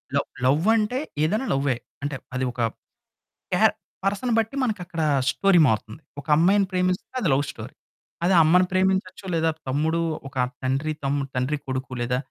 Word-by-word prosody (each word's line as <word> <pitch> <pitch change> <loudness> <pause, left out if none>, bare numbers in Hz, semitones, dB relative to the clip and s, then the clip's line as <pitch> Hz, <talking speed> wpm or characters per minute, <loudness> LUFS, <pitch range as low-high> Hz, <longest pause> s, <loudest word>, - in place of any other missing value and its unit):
Love, - - +1 0.2
లవంటే 210 - +2 0.2
ఏదైనా 215 +11 +1
లవ్వే. 135 -1 +1 0.3
అంటే 145 -1 -2 0.2
అది 130 0 0
ఒక 120 - -12 0.9
క్యార్ - - +4 0.3
పర్సన్‌ని 205 +4 0
బట్టి 225 +5 -1
మనకక్కడ 180 -8 -2 0.3
స్టోరీ 175 +6 +4
మారుతుంది. 110 +3 -2 0.2
ఒక 140 - -17
అమ్మాయిని 195 +5 +4
ప్రేమిస్తే 180 0 0
అది 185 - 0
లవ్ 140 - +1
స్టోరీ - - -10 0.5
అది 185 +1 +4
అమ్మని 180 +4 +5
ప్రేమించొచ్చు 190 0 0
లేదా 165 0 +2 0.2
తమ్ముడు, 155 +5 +1 0.3
ఒక 135 - -19 0.3
తండ్రి-తమ్ముడు, 140 +1 -1
తండ్రి-కొడుకు, 130 0 -2
లేదా 125 +1 0
165 Hz, 135 wpm, -24 LUFS, 135-190 Hz, 0.9 s, అమ్మని